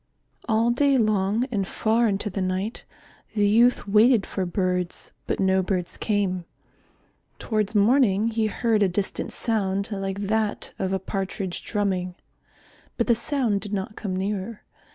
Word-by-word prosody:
All 225 +2 +3
day 275 +2 +3
long 215 0 +1
and 200 -5 -1
far 230 +4 +1
into 205 0 -1
the 195 - -3
night 185 +4 -2 0.5
the 205 -1 +3
youth 235 +2 +4
waited 215 +1 +5
for 190 -2 -3
birds, 180 -1 -2 0.2
but - - -1
no 190 -1 +3
birds 180 -1 -2
came. 195 -4 -1 0.9
Towards 215 -1 -1
morning 215 -1 +4
he 220 -1 0
heard 220 0 +1
a 200 - +4
distant 190 +2 -3
sound 200 -2 -1
like 195 -1 -3
that 215 +1 -1
of 190 - -1
a 190 - +1
partridge 190 -1 -4
drumming. 185 -4 -1 0.8
But - - +1
the 240 - +4
sound 235 -4 0
did 205 +1 -6
not 205 +2 -3
come 195 -4 -4
nearer. 200 +3 -3
205 Hz, 150 wpm, -25 LUFS, 190-220 Hz, 0.9 s, waited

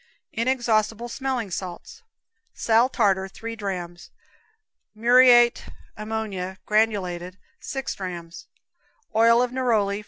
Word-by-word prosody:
Inexhaustible 230 -2 0
Smelling 255 -5 -3
Salts. 185 - -7 0.5
Sal 230 +2 +3
tartar, 195 -6 +1
three 230 +4 -8
drams; 180 -4 -6 0.9
muriate 240 +1 +5 0.3
ammonia, 210 -4 -4
granulated, 190 -4 0 0.2
6 270 -1 -4
drams; 175 -3 -8 0.7
oil 230 +2 +5
neroli. 225 -6 0
220 Hz, 85 wpm, -24 LUFS, 190-240 Hz, 0.9 s, muriate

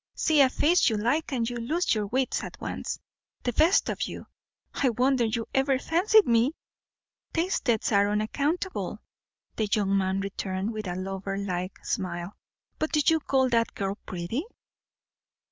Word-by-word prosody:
See 310 -3 +3
a 265 - +6
face 320 +4 +3
you 220 - 0
like, 245 +10 0
and 235 -4 0
you 245 0 -3
lose 310 +10 0
your 210 -2 -1
wits 255 +4 0
at - - -8
once, - - -4 0.5
the 245 - -1
best 325 - +4
of - - -3
you. - - -8 0.5
I 270 - +2
wonder 250 +1 +2
you 225 +1 -1
ever 270 0 +2
fancied 380 +9 +4
me!" 235 +5 +3 0.8
"Tastes 305 - 0
are 200 -1 +4
unaccountable," 285 - -2 0.5
the 215 -2 0
young 200 -3 +2
man 190 0 +1
returned, 195 +1 -3
with 215 -2 -5
a 175 - -3
lover 195 +1 -4
like 185 -2 -4
smile. 175 0 -3 0.5
"But 310 - -2
do 305 - +4
you 320 -1 +4
call 265 -3 +2
that 230 -1 +1
girl 195 0 -2
pretty?" 185 - -3
230 Hz, 160 wpm, -27 LUFS, 200-280 Hz, 0.8 s, a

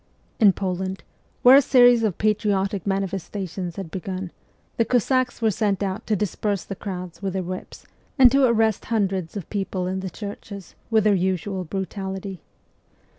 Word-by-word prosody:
In 210 -4 +7
Poland, 190 0 -3 0.4
where 250 +2 +9
a 280 - +8
series 245 -3 +6
of 215 -6 0
patriotic 205 -2 0
manifestations 195 -2 -3
had 190 -5 -6
begun, 185 0 -5 0.5
the 230 - +4
Cossacks 250 +1 +1
were 220 - +4
sent 205 -2 0
out 190 0 -4
to 215 - +2
disperse 205 0 -1
the 195 - -6
crowds 180 -3 -7
with 195 -2 -2
their 190 -1 -2
whips, 185 +1 -7 0.3
and 255 -3 +8
to 275 0 +4
arrest 225 -3 +2
hundreds 195 -5 -1
of 190 - -6
people 190 -2 -2
in 185 +1 -2
the 190 0 -4
churches 200 0 -8 0.2
with 220 -2 +3
their 210 -1 +4
usual 190 0 -1
brutality. 190 +1 -5
195 Hz, 160 wpm, -23 LUFS, 185-215 Hz, 0.5 s, where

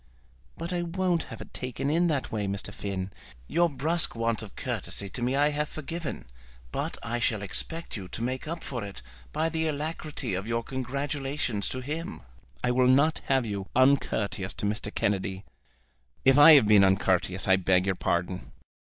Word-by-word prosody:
"But 170 +2 -4
I 175 - 0
won't 175 0 0
have 115 - -9
it - - -11
taken 130 +3 -3
in 170 +3 +3
that 145 -5 -1
way, 105 -2 -1
Mr. 100 +1 -4
Finn. 95 -2 -4 0.4
Your 175 0 +3
brusque 160 +3 +2
want 115 -1 0
of 105 -4 -10
courtesy 100 - -3
to 120 - -3
me 125 +2 +1
I 145 +1 +4
have 150 0 -1
forgiven, 160 +1 -5 0.5
but - - -3
I 120 +1 -2
shall 110 -3 0
expect 165 - -2
you 95 -4 -6
to 115 - -4
make 130 +4 -3
up 165 +1 -5
for 120 -5 -4
it 100 -9 -8 0.3
by 160 - 0
the 160 0 -1
alacrity 150 -4 -3
of 95 +3 -3
your 115 0 -1
congratulations 135 -2 -2
to 130 - -3
him. 155 +6 -5 0.4
I 125 - +2
will 125 0 +3
not 140 +5 +4
have 135 -2 +2
you 100 -3 -4
uncourteous 115 -7 +2
to - - -3
Mr. 105 0 -2
Kennedy." 95 -1 -1 0.8
"If 135 0 +7
I 155 +2 +11
have 140 -7 +7
been 105 -2 +7
uncourteous 95 -1 +2
I 95 0 +6
beg 90 0 +2
your 95 - +2
pardon." 90 +1 -2
125 Hz, 180 wpm, -28 LUFS, 100-150 Hz, 0.8 s, I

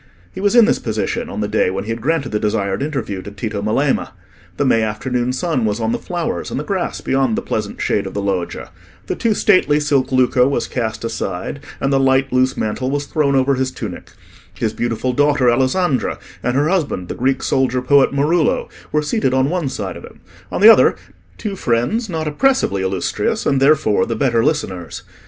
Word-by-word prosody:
He 190 - -6
was 205 +3 +2
in 235 -2 +8
this 240 - +1
position 110 -2 -2
on - - -4
the 105 - -1
day 105 -2 +1
when 95 +1 -3
he 110 - -4
had 115 0 -4
granted 150 0 0
the 105 - -1
desired 105 0 -1
interview 135 -10 -3
to 100 - -8
Tito 105 +1 -4
Melema. 135 +7 0 0.4
The 145 - +1
May 115 -3 +3
afternoon 120 +3 -1
sun 135 -1 -1
was 105 0 0
on 110 0 0
the - - -1
flowers 175 -2 -3
and - - -3
the - - -3
grass 185 +2 -3
beyond 135 -4 +1
the - - -1
pleasant 105 -2 -3
shade 100 -2 0
of 95 - -8
the 100 - -1
loggia; 95 -3 -3 0.3
the - - -3
too 225 -3 0
stately 150 -7 +3
silk 140 -3 +1
lucco 125 -1 +3
was 140 - 0
cast 115 -3 -3
aside, 110 +1 -4 0.2
and 135 - 0
the 135 - +3
light 135 0 +2
loose 130 +1 +2
mantle 120 +4 -2
was 145 +1 -2
thrown 140 -3 +1
over 135 +1 +3
his 130 0 0
tunic; - - -8 0.4
his 110 - -2
beautiful 120 +2 -2
daughter 145 -2 +3
Alessandra 130 +4 +1 0.2
and 125 - -1
her 145 +2 +2
husband, 155 - -1
the - - -4
Greek 130 +1 0
soldier 130 -1 +1
poet 140 +1 +4
Marullo, 150 +4 +1 0.2
were 150 0 +1
seated 150 - 0
on 130 +3 +2
one 175 -6 -1
side 100 -8 -5
of - - -10
him: - - -14 0.3
on - - -2
the 215 - +10
other, 225 - +6 0.4
two 210 -3 -4
friends 185 - 0
not 160 -3 -3
oppressively 150 - +1
illustrious, 95 -1 -1
and 135 -1 +2
therefore 140 -7 +3
the 115 - -2
better 115 -1 +1
listeners. 95 - -2
130 Hz, 205 wpm, -18 LUFS, 110-150 Hz, 0.4 s, the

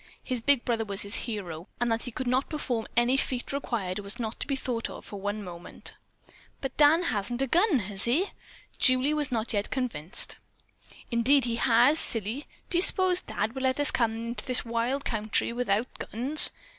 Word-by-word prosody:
His 255 -3 -3
big 280 0 +3
brother 230 -2 0
was 200 -2 0
his 200 +1 -7
hero, 190 -8 -4
and 240 -1 0
that 225 0 0
he 245 - -5
could 255 +3 -5
not 255 +2 0
perform 250 -7 -3
any 240 +3 +3
feat 255 -2 -2
required 210 -9 -3
was 200 0 -3
not 225 -2 -5
to - - -2
be 275 - 0
thought 245 -3 -3
of - - -10
for 200 -2 -8
one 205 +1 -3
moment. 175 -2 -6 0.7
"But 270 -1 -5
Dan 305 +4 +5
hasn't 240 - -1
a - - +2
gun, 345 - +3
has 200 -3 -3
he?" 310 +12 +1 0.5
Julie 255 +3 +3
was 300 -3 +1
not 230 -1 -1
yet 205 -1 -1
convinced. 230 - 0 0.7
"Indeed 255 +4 +3
he 230 -1 -2
has, 245 +6 +4
silly. 225 +6 0 0.2
Do 350 - +3
you - - +2
s'pose 370 -1 +4
Dad 220 - -3
would 265 - -5
let 260 +1 0
us 290 - +4
come 230 -2 0
into 230 +1 -4
this 255 -2 +2
wild 235 +4 -2
country 220 0 0
without 235 -2 0
guns? 265 +8 +6
240 Hz, 195 wpm, -27 LUFS, 220-270 Hz, 0.7 s, guns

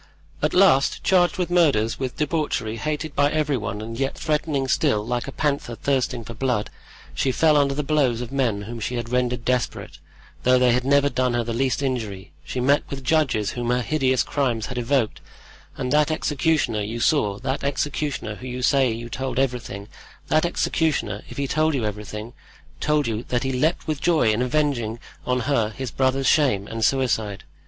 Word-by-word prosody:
"At - - 0
last, 180 -8 +4
charged 180 0 +3
with 180 -2 -1
murders, 140 -11 +3
with 130 -2 -4
debauchery, 145 -7 -1
hated 150 +3 -3
by 145 0 +3
every 150 -2 +1
one 105 -3 -4
and 115 +2 -6
yet 135 0 -1
threatening 150 -3 -1
still, 125 -6 +1
like 120 +2 -2
a - - -4
panther 140 -5 -1
thirsting 130 -1 -1
for 115 - -8
blood, 120 -3 -1 0.4
she 135 - 0
fell 155 +3 +3
under 140 -1 +3
the 150 - -1
blows 135 -5 +1
of 125 0 -6
men 120 -7 0
whom 115 +3 -7
she 125 +3 -3
had 120 -1 -3
rendered 125 -1 0
desperate, 125 -1 -2 0.4
though 125 0 +4
they 125 -1 +4
had 125 +1 +1
never 140 +1 +4
done 125 -3 0
her 120 - +1
the 115 0 -3
least 130 +2 0
injury; 110 -8 -3
she 125 - -4
met 140 +4 +3
with 135 -1 -6
judges 130 -8 +1
whom 120 -1 -3
her 125 0 +1
hideous 130 -2 +1
crimes 120 -6 -1
had 125 -2 -4
evoked; 120 -2 0 0.6
and 125 +1 -2
that 150 +1 +4
executioner 150 -6 0
you 110 +3 -4
saw—that 120 -1 0
executioner 140 -4 -2
who 125 +4 -9
you 125 0 -5
say 120 -4 +2
told 130 +1 -4
you 135 - +5
everything—that 125 - -3
executioner, 140 - 0
if - - -10
he 140 -1 -1
told 155 +2 +1
you 120 -5 -1
everything, 105 +2 -5 0.5
told 150 -1 +1
you 115 -1 -2
that 125 +1 0
he 135 - -1
leaped 155 +7 0
with 155 -2 -3
joy 155 -10 +3
in 110 - 0
avenging 125 -4 0 0.3
on 125 0 +1
her 115 -4 +1
his 125 +2 -6
brother's 135 +1 +1
shame 130 -12 +3
and 115 0 -4
suicide. 110 -6 +1
130 Hz, 185 wpm, -23 LUFS, 115-145 Hz, 0.6 s, you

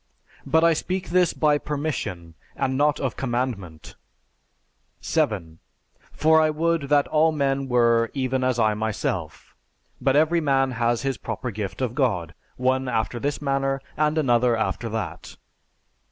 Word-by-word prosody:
But 160 0 +3
I 165 0 +5
speak 185 +4 -3
this 180 -1 +3
by 150 -1 +2
permission, 125 - -4 0.2
and 130 - -1
not 150 +2 +2
of 135 -3 -2
commandment. 120 - -4 1.1
7. 80 0 -1 0.5
For 160 +1 +4
I 155 - +3
would 160 -1 0
that 145 -1 +3
all 160 +1 +3
men 140 -2 0
were 115 -1 +3
even 130 -1 -1
as 130 -1 +1
I 110 -2 +3
myself. 95 -7 -3 0.5
But 135 0 +2
every 160 +3 +3
man 135 -3 +2
has 120 0 0
his 135 -1 -2
proper 125 -2 -4
gift 105 +4 -4
of 120 -3 -1
God, 105 - 0 0.2
one 130 +1 +1
after 115 0 -1
this 145 +3 -3
manner, 135 -1 0 0.2
and 150 +1 +1
another 120 -5 +3
after 115 +1 -2
that. 110 -4 -5
130 Hz, 145 wpm, -24 LUFS, 115-150 Hz, 1.1 s, I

